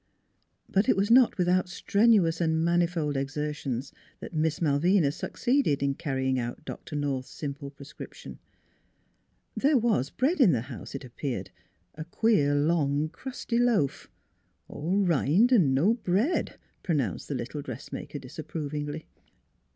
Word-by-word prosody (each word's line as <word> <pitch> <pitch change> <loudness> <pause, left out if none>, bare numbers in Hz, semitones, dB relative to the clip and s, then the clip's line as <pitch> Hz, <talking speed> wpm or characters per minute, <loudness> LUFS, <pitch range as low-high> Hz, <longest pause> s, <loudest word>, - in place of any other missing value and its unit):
" - - -46
But 195 +2 +1
it - - +4
was 200 +3 +1
not 250 -2 +6
without 180 0 +2
strenuous 195 -3 +3
and 160 0 +1
manifold 170 -3 +1
exertions 140 -2 -3 0.3
that - - -9
Miss 160 0 0
Malvina 160 +1 +3
succeeded 240 - 0
in 140 0 +1
carrying 130 -3 -1
out 120 +5 -5
Doctor 155 - -7
North's 140 -3 -2
simple 140 -1 -6
prescription. 140 +1 -11 1.2
There 280 +1 +3
was 220 - +1
bread 290 +6 0
in 195 - +6
the 120 - 0
house, 130 - -9
it 135 - -6
appeared, 130 +1 -5 0.4
a 155 +1 -7
queer 170 -6 +2
long 145 -1 +1
crusty 240 +5 -4
loaf. 230 - +1 0.3
" - - -45
All 185 +7 -1
rind 180 - +3
an' 155 - +4
no 180 +12 +4
bread," 230 - 0 0.2
pronounced 140 - -1
the - - -3
little - - -4
dressmaker - - -7
disapprovingly. 150 0 -5
160 Hz, 135 wpm, -28 LUFS, 140-195 Hz, 1.2 s, not